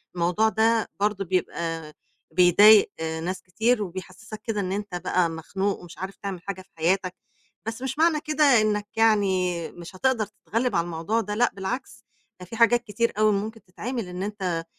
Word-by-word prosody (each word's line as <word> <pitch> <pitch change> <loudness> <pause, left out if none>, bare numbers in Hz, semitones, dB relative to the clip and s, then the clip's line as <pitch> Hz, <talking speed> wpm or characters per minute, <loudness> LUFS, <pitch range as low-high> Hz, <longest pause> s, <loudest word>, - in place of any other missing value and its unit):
الموضوع 180 +6 +2
ده 225 +1 +2
برضه 205 -1 0
بيبقى 165 -3 -2 0.4
بيضايق 200 +5 +7
ناس 160 +3 -3
كتير، 220 +5 +1
وبيحسسك 190 +3 -8
كده 220 -3 -2
إن 185 -1 -2
أنت 205 -2 -4
بقى 175 0 +1
مخنوق 190 +5 -2
ومش 175 -1 -13
عارف 190 +1 -6
تعمل 190 -3 -6
حاجة 190 0 -6
في 185 - -21
حياتَك، 185 +3 +1 0.5
بس 225 +2 -5
مش 265 +3 -4
معنى 325 -2 +4
كده 305 0 0 0.2
إنَّك، 210 -1 0
يعني 190 -6 +2
مش 175 +2 -11
هتقدر 240 +1 +1
تتغلب 230 +4 -2
على 170 0 +2
الموضوع 175 +7 -1
ده. 210 -1 -4
لأ، 245 +2 +3
بالعكس 230 +7 -5 0.4
ده 180 - -9
فيه 225 - -8
حاجات 235 +1 +4
كتير 235 +1 -1
أوي 215 0 +4
ممكن 215 +3 -3
تتعمل 220 +4 -5
إن 180 +1 -5
أنت، 185 -5 -3
200 Hz, 170 wpm, -25 LUFS, 180-220 Hz, 0.5 s, بيضايق